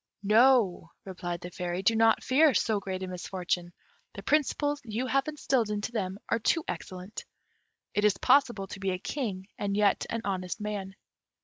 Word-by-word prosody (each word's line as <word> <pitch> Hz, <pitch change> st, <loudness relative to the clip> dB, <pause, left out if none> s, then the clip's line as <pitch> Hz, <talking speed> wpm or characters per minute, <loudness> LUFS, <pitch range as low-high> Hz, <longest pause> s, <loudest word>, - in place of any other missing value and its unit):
"No," 215 Hz, -5 st, +4 dB, 0.2 s
replied 175 Hz, -2 st, -5 dB
the 175 Hz, -, -7 dB
Fairy, 180 Hz, +1 st, -3 dB
"do 225 Hz, +4 st, +4 dB
not 225 Hz, 0 st, +4 dB
fear 285 Hz, 0 st, +4 dB
so 215 Hz, +2 st, +2 dB
great 190 Hz, -1 st, -4 dB
a -, -, -3 dB
misfortune; 180 Hz, -1 st, -3 dB, 0.4 s
the -, -, -8 dB
principles 290 Hz, -1 st, +1 dB
you 230 Hz, +2 st, -3 dB
have 275 Hz, +2 st, +1 dB
instilled 270 Hz, -7 st, 0 dB
into 210 Hz, +1 st, -2 dB
them 195 Hz, -4 st, -2 dB
are 230 Hz, -, +1 dB
too 325 Hz, +8 st, +1 dB
excellent. 185 Hz, +2 st, -6 dB, 0.7 s
It 210 Hz, -, +1 dB
is 210 Hz, -1 st, +4 dB
possible 240 Hz, -8 st, +3 dB
to 195 Hz, -, -9 dB
be 195 Hz, 0 st, -1 dB
a 185 Hz, -, -1 dB
king 195 Hz, -4 st, -4 dB
and 200 Hz, 0 st, -1 dB
yet 205 Hz, -1 st, +2 dB
an 230 Hz, -, -2 dB
honest 185 Hz, -3 st, -3 dB
man. 205 Hz, -2 st, -4 dB
205 Hz, 175 wpm, -29 LUFS, 185-235 Hz, 0.7 s, No